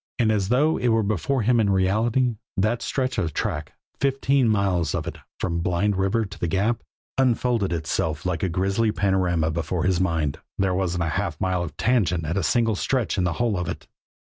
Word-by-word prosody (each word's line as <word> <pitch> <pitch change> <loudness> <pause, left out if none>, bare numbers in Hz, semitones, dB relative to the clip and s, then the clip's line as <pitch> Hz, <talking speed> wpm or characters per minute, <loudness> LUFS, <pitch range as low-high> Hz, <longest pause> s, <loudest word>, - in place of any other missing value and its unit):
And 115 -3 +3
as 100 -3 0
though 145 +6 +3
it 125 - 0
were 115 -1 +3
before 110 +6 0
him 120 +2 +3
in 105 -3 +2
reality, 110 +6 +2 0.2
that 110 +5 +1
stretch 130 -3 -1
of 80 -7 -2
track, - - -2 0.3
fifteen 135 -2 +2
miles 95 -7 +1
of - - -2
it, - - -6 0.2
from 85 -2 -1
Blind 90 +4 +1
River 95 +4 +1
to 95 0 -10
the 85 - -1
Gap, 105 +7 0 0.4
unfolded 120 -5 +2
itself 80 -1 -2
like 85 -3 -1
a 95 - 0
grisly 100 +5 +1
panorama 90 -6 +1
before 85 +2 -2
his 95 -2 +2
mind. 80 -6 0 0.2
There 95 -1 +1
wasn't 90 -2 0
a 80 - -1
half 85 -7 -3
mile 95 -1 0
of 85 - -6
tangent 95 -9 +1
at 80 +3 -2
a 100 - +1
single 115 +6 +2
stretch 120 -1 0
in 90 - +2
the 90 - 0
whole 120 0 0
of 90 -2 -2
it. - - -6
95 Hz, 200 wpm, -24 LUFS, 85-115 Hz, 0.4 s, And